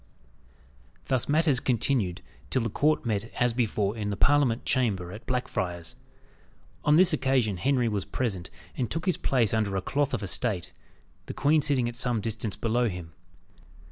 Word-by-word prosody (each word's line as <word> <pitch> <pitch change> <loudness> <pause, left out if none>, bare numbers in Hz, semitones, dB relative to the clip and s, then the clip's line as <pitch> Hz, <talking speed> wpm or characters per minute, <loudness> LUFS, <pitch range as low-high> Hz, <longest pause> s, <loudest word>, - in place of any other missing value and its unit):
Thus 130 -1 -1
matters 150 -3 +3
continued 115 -7 0 0.3
till 130 - +1
the 115 - -2
court 150 +4 +1
met 110 0 -1
as 125 -1 +2
before 110 -3 0
in 105 -2 -3
the 100 - -3
Parliament 140 -5 +3
chamber, 100 -9 0
at 110 +3 -10
Blackfriars. 90 -9 -3 0.9
On 150 - +4
this 180 0 +5
occasion 130 -8 +1
Henry 125 +4 +1
was 105 -3 -1
present, 100 -9 -3 0.3
and 125 - -2
took 165 +2 -3
his 185 - +1
place 120 -6 +1
under 105 -3 0
a 95 - 0
cloth 145 +4 0
of - - -5
estate, 100 -1 0 0.5
the - - -6
queen 150 +2 +3
sitting 140 -5 +2
at 120 - -5
some 120 -2 +1
distance 110 -2 -3
below 120 +1 +1
him. 90 -3 -7
120 Hz, 165 wpm, -27 LUFS, 105-135 Hz, 0.9 s, this